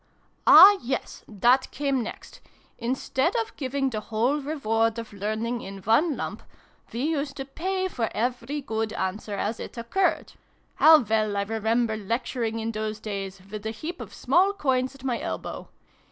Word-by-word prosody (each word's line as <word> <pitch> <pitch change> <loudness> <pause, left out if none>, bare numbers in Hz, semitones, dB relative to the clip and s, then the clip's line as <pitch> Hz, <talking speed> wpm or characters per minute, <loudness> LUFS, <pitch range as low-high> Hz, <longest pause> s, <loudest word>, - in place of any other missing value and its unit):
"Ah, 400 0 +10
yes! 255 +3 -4
that 240 +5 +3
came 275 -2 -1
next. 225 - -8 0.4
Instead 260 +2 -1
of 225 0 -2
giving 270 -1 -1
the 215 - -2
whole 230 +7 0
reward 225 -6 0
of 230 -2 -7
learning 215 +4 -2
in 195 +1 -8
one 270 - +3
lump, - - -5 0.5
we 235 - -4
used 290 -2 -1
to 270 - -4
pay 375 +7 -2
for 235 -11 -2
every 245 +5 -2
good 220 -3 -3
answer 205 0 -3
as 210 +3 -2
it - - -8
occurred. 300 +12 0 0.4
How 315 0 +8
well 215 -2 0
I 200 - +1
remember 225 +2 0
lecturing 230 +2 -2
in 225 0 -2
those 215 -1 -4
days, 195 -3 -5
with 210 -1 -6
a 220 - -2
heap 310 +11 -6
of - - -8
small 385 +3 +2
coins 260 -6 0
at 270 - -16
my 250 -3 -1
elbow! - - -5
235 Hz, 165 wpm, -26 LUFS, 220-275 Hz, 0.5 s, Ah